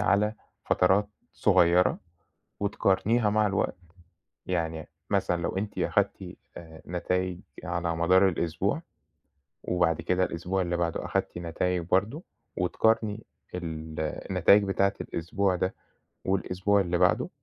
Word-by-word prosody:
على 105 +1 +2 0.3
فترات 95 +3 +3 0.2
صغيرة 85 +1 +4 0.6
وتقارنيها 105 +2 +2
مع 105 0 +2
الوقت، 100 -1 0 0.7
يعني 80 -3 -2 0.2
مثلًا 85 -1 +1
لو 85 - -2
أنتِ 105 +1 -4
أخدتِ - - -1 0.2
آآ، 80 -2 -11
نتايج 90 +1 -2 0.2
على 85 -1 -2
مدار 90 +4 +4
الأسبوع 85 -2 -1 0.8
وبعد 80 -3 +1
كده 90 0 +1
الأسبوع 90 +3 -2
اللي 85 0 -1
بعده 85 -1 -1
أخدتِ - - -2
نتايج 85 +1 -1
برضه 105 - +1 0.3
وتقارني 110 +4 +1 0.3
ال 80 -3 -5
النتايج 90 +5 +3
بتاعة 100 0 +1
الأسبوع 95 +3 -1
ده 95 +1 -1 0.5
والأسبوع 95 +1 +1
اللي 90 -2 0
بعده، 90 0 +2
90 Hz, 115 wpm, -28 LUFS, 85-100 Hz, 0.8 s, صغيرة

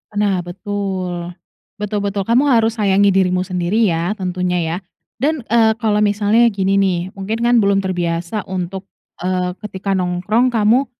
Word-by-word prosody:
Nah, 200 -3 +1
betul. 185 -2 -4 0.5
Betul 210 0 -2
betul, 200 0 -1
kamu 240 +5 +3
harus 225 -1 +2
sayangi 200 -1 +3
dirimu 185 -1 +2
sendiri 180 +3 -1
ya, 170 +3 -1
tentunya, 180 -3 -2
ya. 165 +1 -2 0.4
Dan, 290 +3 0
eee, 225 -1 +4
kalau 210 -2 +2
misalnya 210 +3 +3
gini 195 -1 +1
nih, 190 -3 +2 0.2
mungkin 215 +4 -3
kan, 240 +1 +3
belum 200 0 +3
terbiasa 175 +1 -2
untuk, 185 +1 -5 0.4
eee, 180 0 -1
ketika 195 -1 -3
nongkrong 185 +8 +1
kamu, 230 +5 +3
195 Hz, 145 wpm, -18 LUFS, 180-215 Hz, 0.5 s, eee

